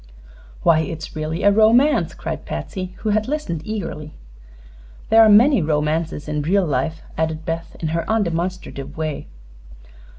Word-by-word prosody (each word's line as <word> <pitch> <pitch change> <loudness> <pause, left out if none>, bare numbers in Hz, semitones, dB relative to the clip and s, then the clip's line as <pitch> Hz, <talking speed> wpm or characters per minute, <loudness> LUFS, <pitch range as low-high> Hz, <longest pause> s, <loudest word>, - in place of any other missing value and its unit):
"Why, 165 -2 +5
it's 160 -1 -5
really 155 +1 -3
a 205 - +6
romance!" 220 - +4
cried - - -5
Patsy, 185 - -5
who 215 - -1
had 215 +2 +1
listened 280 - -3
eagerly. 165 -8 -5 0.9
"There 225 0 +7
are 220 - +7
many 230 +3 +6
romances 155 0 -1
in 150 0 -2
real 185 +5 +2
life," 155 +2 -2 0.2
added 160 0 -2
Beth, 165 +1 -4
in 160 - -2
her 165 +1 -1
undemonstrative 180 -8 -2
way. 155 -2 -4
165 Hz, 140 wpm, -21 LUFS, 155-210 Hz, 0.9 s, There